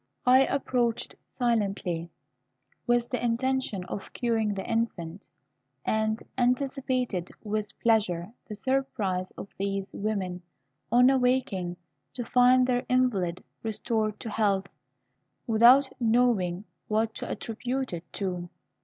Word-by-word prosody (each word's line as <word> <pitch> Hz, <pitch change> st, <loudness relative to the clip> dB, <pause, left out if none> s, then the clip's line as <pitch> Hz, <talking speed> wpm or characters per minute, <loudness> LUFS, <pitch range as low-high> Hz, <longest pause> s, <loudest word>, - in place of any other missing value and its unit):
I 260 Hz, +2 st, +6 dB
approached 245 Hz, -4 st, 0 dB, 0.2 s
silently, 200 Hz, -8 st, 0 dB, 0.8 s
with 240 Hz, 0 st, +2 dB
the 250 Hz, -, -2 dB
intention 245 Hz, -4 st, 0 dB
of 195 Hz, +2 st, -6 dB
curing 225 Hz, -4 st, 0 dB
the 190 Hz, -, -5 dB
infant, 205 Hz, -6 st, -2 dB, 0.6 s
and 220 Hz, 0 st, +1 dB, 0.2 s
anticipated 250 Hz, -6 st, 0 dB
with 210 Hz, -1 st, -3 dB
pleasure 205 Hz, -5 st, +2 dB, 0.2 s
the 215 Hz, -, -5 dB
surprise 205 Hz, -7 st, -1 dB
of -, -, -6 dB
these 195 Hz, 0 st, -1 dB
women, 195 Hz, -4 st, -2 dB, 0.5 s
on 250 Hz, +2 st, +6 dB
awaking, 250 Hz, -9 st, +1 dB, 0.4 s
to 245 Hz, -2 st, -3 dB
find 250 Hz, +1 st, +5 dB
their 250 Hz, -1 st, +1 dB
invalid 205 Hz, -9 st, +1 dB, 0.2 s
restored 220 Hz, -1 st, -1 dB
to 225 Hz, -, -5 dB
health, 200 Hz, -3 st, +1 dB, 0.8 s
without 240 Hz, +5 st, +6 dB
knowing 220 Hz, -6 st, +2 dB, 0.2 s
what 220 Hz, +1 st, +1 dB
to -, -, -5 dB
attribute 250 Hz, +2 st, -3 dB
it 170 Hz, 0 st, -7 dB
to. 180 Hz, -3 st, -3 dB
225 Hz, 110 wpm, -28 LUFS, 195-250 Hz, 0.8 s, I